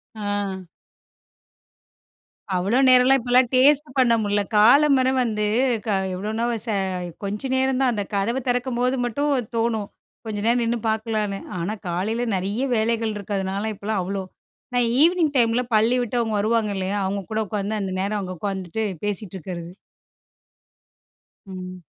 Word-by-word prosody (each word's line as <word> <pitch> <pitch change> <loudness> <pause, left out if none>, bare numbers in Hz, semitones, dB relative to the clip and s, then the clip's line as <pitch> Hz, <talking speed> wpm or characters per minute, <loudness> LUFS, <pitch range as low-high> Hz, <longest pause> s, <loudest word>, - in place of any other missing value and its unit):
ஆ. 205 -3 -3 1.9
அவ்ளோ 195 +7 +1
நேரம்லாம் 255 +1 +6
இப்பல்லாம் 245 +1 +3
டேஸ்ட் 290 +3 +5
பண்ண 245 -3 +4
முடியல. 205 0 +1 0.2
காலையில 260 +4 +5 0.2
வந்து, 210 -3 -1 0.4
கா 205 - +2 0.2
எவ்வளவுன்னா 215 +5 -2 0.2
ச - - -21 0.6
கொஞ்ச 210 +7 -3
நேரந்தான், 260 -1 +2
அந்த 205 - -2
கதவ 230 +6 0
திறக்கும்போது 250 +1 0
மட்டும் 285 +5 -1 0.2
தோணும். 225 -3 0 0.4
கொஞ்ச 215 -1 -4
நேரம் 235 +1 +3
நின்னு 235 +1 0
பாக்கலான்னு. 215 -2 -1 0.2
ஆனா, 190 +6 -2
காலையில 215 +8 -1
நெறைய 200 +6 -2
வேலைகள் 225 0 0
இருக்கிறதுனால, 200 +1 -3
இப்பல்லாம் 205 0 -2
அவ்ளோ 195 0 -3 0.5
நான் 245 -1 +2
ஈவினிங் 330 -2 +3
டைம்ல 235 -1 +3
பள்ளி 225 +4 +4
விட்டு 245 -1 -3
அவுங்க 225 -2 -1
வருவாங்க 215 0 +1
இல்லயா! 190 +1 -2
அவுங்க 195 +1 -2
கூட 220 - -1
உக்காந்து 205 +1 -2
அந்த 190 -1 -3
நேரம் 205 +2 -1
அங்க 185 -1 -5
உக்காந்துட்டு 190 +2 -3 0.2
பேசிட்டுருக்கிறது. 185 -4 -4 1.8
ம். 185 -1 -8
220 Hz, 130 wpm, -23 LUFS, 200-245 Hz, 1.9 s, நேரம்லாம்